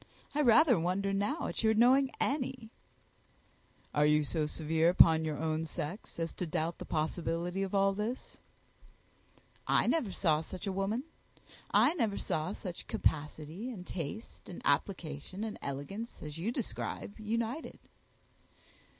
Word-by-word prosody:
I 300 - +2
rather 245 - +6
wonder 190 +4 0
now 205 +11 0
at - - -2
your 220 -1 +3
knowing 260 +4 +5
any." 255 -5 -1 1.2
"Are 150 - +3
you 150 0 +4
so 150 +1 0
severe 160 +2 +2
upon 160 -2 +6
your 155 -2 -2
own 160 0 -1
sex 160 +4 -6
as 165 0 -2
to 180 - -4
doubt 160 +2 -2
the - - -6
possibility 170 +3 -1
of 195 0 -2
all 195 0 +4
this?" 215 +5 -4 1.3
"I - - +4
never 265 -12 +1
saw 160 -4 +2
such 180 +4 -7
a 195 - -1
woman. 200 +6 -1 0.7
I - - +5
never 225 - 0
saw 155 +3 -1
such 180 -4 -7
capacity, 155 - -1
and 195 -8 -7
taste, 180 +8 -6
and 180 - -7
application, 160 +3 -1
and 220 -1 -4
elegance, 145 - -5
as 150 -1 -6
you 180 +8 -2
describe, 230 -3 -4
united." 230 +7 -2
185 Hz, 140 wpm, -32 LUFS, 160-225 Hz, 1.3 s, rather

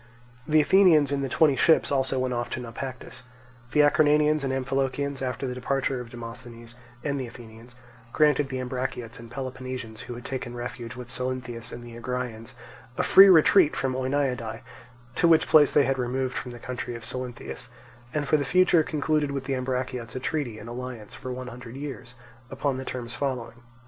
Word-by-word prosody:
The 155 0 +5
Athenians 155 -4 +5
in 140 -1 0
the 135 - -2
twenty 150 +1 +4
ships 160 +5 +4
also 135 -1 +1
went 130 -1 0
off 120 0 -2
to - - -3
Naupactus. 125 +1 -7 0.5
The 150 - +5
Acarnanians 150 0 +4
and 135 - -1
Amphilochians, 135 +1 -1
after 130 +1 -2
the 125 - -2
departure 130 0 -1
of 120 - -9
Demosthenes 115 -1 -9 0.3
and 140 -1 -1
the 125 - -4
Athenians, 115 0 -13 0.4
granted 150 -1 +3
the 130 - -3
Ambraciots 125 -2 -4
and 115 0 -11
Peloponnesians 130 -3 -6
who 120 - -7
had 120 - -10
taken 125 -2 -5
refuge 120 -1 -6
with 125 -1 -9
Salynthius 125 -2 -4
and 120 - -8
the 120 -1 -10
Agraeans 120 -1 -5 0.4
a 180 - +1
free 195 +2 +9
retreat 175 -1 +6
from 130 -1 -1
Oeniadae, 130 -3 -1 0.6
to 170 - +4
which 165 -1 +5
place 150 -3 +6
they 145 - +4
had 135 0 0
removed 130 +1 -1
from 125 - -4
the 120 - -8
country 125 0 -5
of 115 -1 -8
Salynthius, 125 +1 -5 0.4
and 145 0 -2
for 155 - +4
the 145 - -1
future 180 +2 +4
concluded 150 -1 0
with 140 -1 -3
the 135 0 -2
Ambraciots 125 -3 -3
a - - -2
treaty 130 -4 -2
and 110 - -10
alliance 120 -3 -7
for 130 - -7
one 130 0 -5
hundred 125 -1 -9
years, 135 -4 -7 0.3
upon 135 0 -1
the 130 - -5
terms 120 -2 -5
following. 120 -3 -4
130 Hz, 185 wpm, -26 LUFS, 120-140 Hz, 0.6 s, free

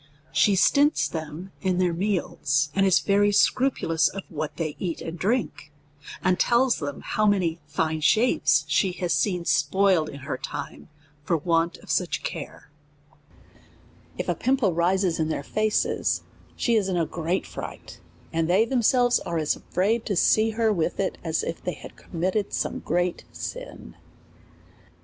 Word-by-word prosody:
She 205 - +3
stints 290 - +3
them 160 +3 -6
in 185 -2 0
their 180 -2 +2
meals, 160 -6 0
and 195 0 +3
is 190 - +4
very 205 0 +3
scrupu 255 +6 +2
lous 160 -1 +3
of 195 -1 -5
what 155 -1 -5
they 155 -3 -3
eat 175 -4 -3
and 165 - -6
drink, 200 -4 -2 0.5
and 185 -1 +2
tells 245 +1 +3
them 145 -2 -5
how 215 0 0
many 180 -5 +1
fine 160 -1 -1
shapes 220 +11 +3
she 190 -3 +1
has 175 -2 -1
seen 180 -4 0
spoiled 190 -6 +2
in 140 - -9
her 130 -1 -4
time 135 - -7 0.3
for 165 +2 +1
want 165 +1 0
of - - -6
such - - 0
care; - - -7 1.5
if - - -3
a - - +2
pimple 255 -8 +1
risi^s 180 +1 +1
in 160 0 0
their 150 - -2
faces, 215 +7 0 0.3
she 235 - 0
is 205 -4 +2
in 180 - 0
a 165 - +1
great 170 +3 -2
fright, - - -9 0.3
and 165 0 0
they 195 +5 +4
themselves 245 0 +3
are 170 - -4
as 155 -2 +1
afraid 220 +5 -1
to 200 - 0
see 215 +5 +4
her 225 -2 +3
with 165 -5 -1
it, 195 - -1
as 160 -1 -1
if 165 - -5
they 180 - -2
had - - -12
committed 185 +4 -2
some - - -2
great 175 +1 -1
sin. - - -8
180 Hz, 165 wpm, -25 LUFS, 165-210 Hz, 1.5 s, is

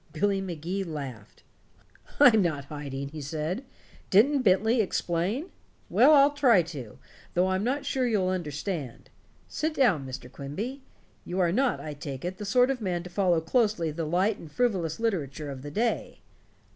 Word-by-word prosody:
Billy 200 -1 +1
Magee 180 +1 -3
laughed. 140 - -8 0.8
"I'm 245 -7 +7
not 155 -6 -1
hiding," 140 -2 -6
he 155 +1 -8
said. 155 - -3 0.5
"Didn't 265 +8 +5
Bentley 220 +3 +3
explain? 195 - -1 0.4
Well, 305 - +6
I'll 280 0 +6
try 255 -10 +4
to, 140 -10 -8 0.4
though 180 +2 +3
I'm 190 +1 0
not 270 +5 -1
sure 260 -2 0
you'll 200 -5 +1
understand. 155 - -4 0.4
Sit 310 0 -2
down, 185 - +2
Mr. 130 -1 -7
Quimby. 190 - -6 0.4
You 180 +2 -4
are 175 -2 +3
not, 255 +6 +1
I 150 - -6
take 145 -1 -7
it, 185 +1 -4
the 210 - -6
sort 250 +6 +4
of 255 -3 -4
man 175 -4 -2
to 180 - -10
follow 180 -3 +2
closely 180 -2 +1
the 160 +2 -3
light 185 +7 +1
and 160 - -11
frivolous 190 -9 0
literature 155 - -2
of 130 -1 -8
the 145 - -7
day." 225 +10 -2
185 Hz, 165 wpm, -27 LUFS, 150-225 Hz, 0.8 s, I'm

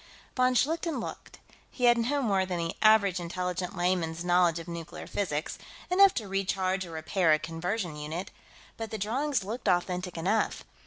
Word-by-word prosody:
Von 255 0 +3
Schlichten 320 +2 +1
looked. - - -7 0.3
He 250 - -7
had 240 -1 +7
no 265 +5 0
more 195 -5 +2
than 185 -1 -3
the 165 -1 -2
average 210 -4 +5
intelligent 180 +1 -3
layman's 175 -2 0
knowledge 175 -2 +3
of 165 - -7
nuclear 170 -2 -7
physics 155 -7 -3 0.3
enough 390 +1 +6
to 215 -4 -3
recharge 190 -1 -1
or - - -10
repair 160 +1 +2
a - - +4
conversion 165 +3 -3
unit 155 +6 -5 0.5
but 225 -1 -5
the 220 - -4
drawings 245 +4 -1
looked 220 +2 -3
authentic 180 0 0
enough. 195 +7 0
185 Hz, 165 wpm, -29 LUFS, 170-225 Hz, 0.5 s, had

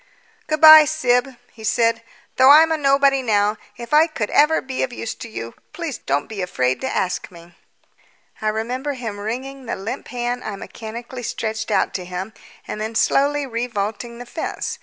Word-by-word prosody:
"Good 310 0 -1
bye, 310 -1 +11
Syb," 260 -4 +1 0.2
he 220 - -14
said; 230 +1 +1 0.4
"though 260 +1 +7
I'm 315 +3 +7
a 320 - +1
nobody 275 -1 +3
now, 210 -3 +1 0.2
if 235 +3 -8
I 310 +2 +6
could 230 -10 -4
ever 300 +2 +4
be 260 -1 -5
of 260 - -1
use 230 -2 -5
to 230 - -10
you, 115 - -7 0.5
don't 140 +1 0
be 210 -3 -6
afraid 130 -8 -1
to 265 - -2
ask 180 -1 -2
me." 170 -1 -16 0.9
I 215 - -2
remember 245 +6 -2
him 225 -6 -6
wringing 255 +5 -6
the - - -2
limp 195 +4 -6
hand 245 0 -3
I 210 - -5
mechanically 235 +5 -8
stretched 220 -1 -4
out 210 - +1
to 180 - -4
him 185 +4 -6 0.3
and 210 - -5
then 220 +1 -4
slowly 285 +4 +2
revaulting 235 -1 -4
the 245 - -9
fence. 315 +7 -5
235 Hz, 180 wpm, -21 LUFS, 215-270 Hz, 0.9 s, bye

